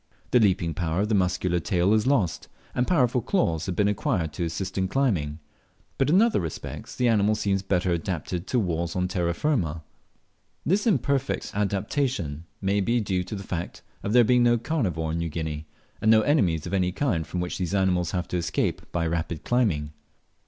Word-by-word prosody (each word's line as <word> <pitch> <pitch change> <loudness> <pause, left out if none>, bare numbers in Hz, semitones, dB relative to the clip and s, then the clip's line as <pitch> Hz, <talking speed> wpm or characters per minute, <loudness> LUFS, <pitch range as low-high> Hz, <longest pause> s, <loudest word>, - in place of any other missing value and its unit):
The 125 - +5
leaping 90 -6 +2
power 85 +2 -1
of 105 - -1
the - - +1
muscular 90 -2 +1
tail 90 +4 +2
is 110 +3 +2
lost, 105 - +1 0.3
and 125 - 0
powerful 125 -7 +2
claws 90 - 0
have 90 - -2
been 105 +2 +2
acquired 100 - -1
to 85 - -3
assist 90 +3 -3
in 95 -1 +1
climbing, 90 - 0 0.6
but 135 - +2
in 185 +7 +6
other 235 - +2
respects 80 -4 -6
the 125 - +1
animal 110 -2 +3
seems 100 -2 0
better 90 -2 0
adapted 85 +1 -3
to 130 - 0
walls 85 -4 -1
on 90 0 +1
terra 85 -2 -1
firma. 85 - 0 0.8
This 195 +8 +2
imperfect 140 - 0
adaptation 100 - -1 0.2
may 100 +1 +1
be 120 +5 +1
due 95 -4 -1
to 105 - -6
the 100 - -6
fact 90 -2 -5 0.2
of 100 - -3
there 120 +1 +6
being 125 +2 +4
no 120 0 +4
carnivore 100 - -1
in 85 - -2
New 85 0 -2
Guinea, 80 -1 -4 0.3
and 110 - +3
no 110 0 +7
enemies 95 - +2
of 90 - -5
any 90 -2 +2
kind 90 - -1
from 90 +2 -3
which 90 +2 -3
these 90 +1 -1
animals 90 -3 +2
have 90 -1 -2
to 90 - -1
escape 85 - -1
by 85 -1 0
rapid 80 -1 -2
climbing. 95 -12 +1
95 Hz, 195 wpm, -26 LUFS, 85-115 Hz, 0.8 s, no